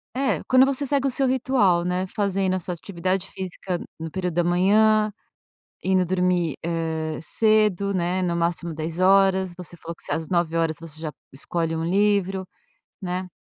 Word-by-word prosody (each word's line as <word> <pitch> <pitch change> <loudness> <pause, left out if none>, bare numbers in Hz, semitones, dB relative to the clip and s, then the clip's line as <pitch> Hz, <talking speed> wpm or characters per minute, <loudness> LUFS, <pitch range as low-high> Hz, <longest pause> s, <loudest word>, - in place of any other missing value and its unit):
É, 270 +1 0
quando 255 0 +6
você 275 +1 +2
segue 275 0 +2
o - - +2
seu 270 +2 +1
ritual, 250 -9 +2
né, 180 +1 -1
fazendo 195 -1 -1
a 185 - 0
sua 180 0 -4
atividade 185 +2 -3
física 185 -1 -4 0.2
no 160 0 -6
período 180 -1 -3
da 175 - +3
manhã, 210 +5 +3 0.7
indo 185 -1 +2
dormir, 180 -3 0
eh, 160 -1 -2
cedo, 210 0 +2
né, 180 +1 0
no 175 -2 0
máximo 170 0 -1
22h. 185 +3 +2
Você 180 -2 -8
falou 165 +1 -7
que - - -14
você - - -4
às 160 +1 -2
21h 165 -2 0
você 160 -2 -6
já 160 -1 -3 0.2
escolhe 165 +4 -2
um 160 - -2
livro, 195 +1 +1 0.5
né. 185 -1 -3
180 Hz, 165 wpm, -24 LUFS, 170-200 Hz, 0.7 s, quando